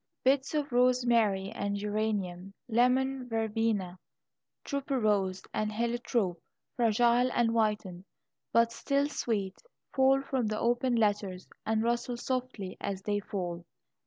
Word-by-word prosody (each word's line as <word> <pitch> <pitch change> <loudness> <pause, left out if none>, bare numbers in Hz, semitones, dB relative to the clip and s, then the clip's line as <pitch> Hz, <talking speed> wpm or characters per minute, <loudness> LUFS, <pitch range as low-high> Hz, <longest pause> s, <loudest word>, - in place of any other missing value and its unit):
Bits 270 +3 +2
of 295 -2 -1
rosemary 240 -6 +3
and 200 0 -2
geranium, 200 -3 -2
lemon 250 +2 +2
verbena, 220 -5 -1 0.7
tuberose, 215 -10 0
and 215 0 -1
heliotrope, 230 -5 -1 0.3
fragile 240 +1 +3
and 235 -1 +2
whitened, 210 -5 -1 0.5
but 230 0 +4
still 280 +4 0
sweet, 205 -9 -2 0.3
fall 270 0 +4
from 260 -4 -1
the 215 0 -2
opened 240 +1 +1
letters 205 -4 0 0.2
and 220 0 +1
rustle 240 +1 -1
softly 250 -7 -3
as 195 -1 -3
they 205 0 0
fall. 180 -4 -4
225 Hz, 115 wpm, -30 LUFS, 200-250 Hz, 0.7 s, but